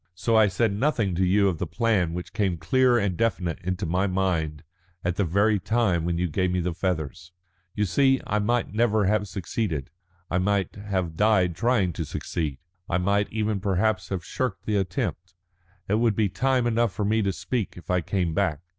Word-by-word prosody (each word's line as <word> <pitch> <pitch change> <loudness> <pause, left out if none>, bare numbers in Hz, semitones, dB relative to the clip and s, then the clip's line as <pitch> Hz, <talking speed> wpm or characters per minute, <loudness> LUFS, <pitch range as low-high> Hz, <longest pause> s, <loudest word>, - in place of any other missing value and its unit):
So 115 +6 0
I 110 -1 +6
said 100 +2 +1
nothing 115 -4 +1
to 90 +2 +1
you 100 +2 +3
of 85 -5 -1
the 90 - -2
plan 100 -6 +1
which 90 - -6
came 100 -5 0
clear 125 +9 +3
and 100 -5 0
definite 90 -6 -1
into 95 +2 -2
my 90 +4 +1
mind 85 -6 -1 0.4
at 90 0 0
the 100 - +1
very 100 +4 +2
time 95 -5 +1
when 85 -1 0
you 90 +1 0
gave 90 +3 0
me 90 0 0
the 90 0 -1
feathers. 85 -1 -3 0.4
You 105 - +1
see, 135 +6 +3
I 105 - 0
might 120 +2 0
never 110 -2 +2
have 105 +1 +1
succeeded. 95 - -3 0.4
I 90 - 0
might 95 -1 0
have 95 -5 -3
died 95 -4 +3
trying 115 -5 +1
to 80 - -3
succeed. 75 -1 -3 0.3
I 85 - +1
might 100 +3 +1
even 110 -2 -1
perhaps 95 0 0
have 95 -4 -3
shirked 130 -2 -3
the 105 -1 +1
attempt. 90 -2 -3 0.5
It 105 +3 +1
would 115 -3 +2
be 105 -2 +2
time 125 +6 +1
enough 120 -2 +2
for 105 - -2
me 110 +2 +2
to 100 -2 +1
speak 115 +1 -3
if 90 - -7
I 90 0 +2
came 85 -1 -1
back. 75 -1 0
95 Hz, 200 wpm, -25 LUFS, 90-110 Hz, 0.5 s, I